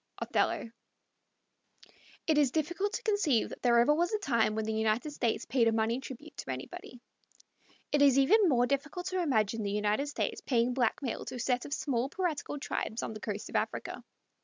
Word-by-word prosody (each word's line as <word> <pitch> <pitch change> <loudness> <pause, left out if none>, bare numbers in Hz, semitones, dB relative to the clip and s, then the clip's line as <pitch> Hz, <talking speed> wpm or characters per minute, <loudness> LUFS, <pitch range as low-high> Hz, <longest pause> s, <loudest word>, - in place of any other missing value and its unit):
Othello. 230 - 0 1.5
It 310 -2 +3
is 285 -3 +4
difficult 345 - -1
to - - -3
conceive 405 - +2
that - - -9
there 240 -1 +4
ever 240 +5 +5
was 345 +3 +1
a 430 - +1
time 230 - +1
when 220 0 -1
the 220 - -1
United 220 +6 0
States 240 -6 -1
paid 245 -3 +2
a - - +4
money 225 +2 +1
tribute 275 +3 -10
to - - -7
anybody. 130 - -7 0.9
It 290 - +3
is 275 -2 +6
even 380 +8 +5
more 245 -3 +4
difficult 285 +7 -2
to 370 -1 -1
imagine 225 - +1
the 205 - -2
United 210 +6 0
States 290 - -2
paying 245 -1 +1
blackmail 245 0 -1
to 255 - -6
a - - -6
set 245 +1 0
of 285 - -5
small 260 -2 -1
piratical 325 -5 -2
tribes 230 -5 -3
on - - -4
the 215 - -7
coast 210 -1 -5
of - - -9
Africa. - - -2
255 Hz, 190 wpm, -31 LUFS, 225-300 Hz, 1.5 s, is